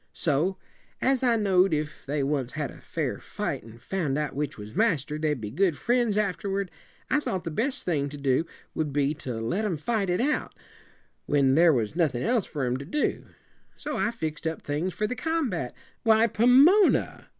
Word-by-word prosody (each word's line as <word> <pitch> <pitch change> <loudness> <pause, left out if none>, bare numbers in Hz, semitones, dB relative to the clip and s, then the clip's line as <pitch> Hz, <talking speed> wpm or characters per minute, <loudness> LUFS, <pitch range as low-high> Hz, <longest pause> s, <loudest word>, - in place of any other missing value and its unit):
So, 165 +5 0 0.4
as 265 -1 +2
I 245 -3 +3
know'd 195 -5 +3
if 150 -2 -5
they 145 0 0
once 135 -3 -1
had 150 -2 -3
a - - -14
fair - - -3
fight - - -4
and 115 +1 -14
found 155 -6 -2
out 150 -2 -2
which 145 0 -3
was 105 +3 -9
master, 155 - +1
they'd 150 -3 0
be 105 -2 -5
good 170 - +1
friends 240 - +1
afterward, 200 -1 -1 0.4
I - - +4
thought 190 -10 -3
the 165 - -4
best 265 - -1
thing 145 -5 0
to 145 - -8
do 140 +3 +1 0.3
would 155 -2 -2
be 145 0 +2
to 125 -3 -4
let 120 - -1
'em 195 -7 -1
fight 200 +4 -1
it 180 - +1
out, 295 +5 0 0.7
when 140 -2 +3
there 165 +3 +6
was 120 -1 -1
nothin' 150 -8 +1
else 235 -4 +1
for 145 -3 -4
'em 125 0 0
to 140 - -7
do. 295 - -1 0.5
So - - -5
I - - +1
fixed 160 -8 -4
up 160 - -4
things 155 +6 -2
for 210 - 0
the 250 - -2
combat." 255 - -2 0.3
"Why, 225 -1 +5
Pomona!" 265 - +4
165 Hz, 195 wpm, -27 LUFS, 145-220 Hz, 0.7 s, there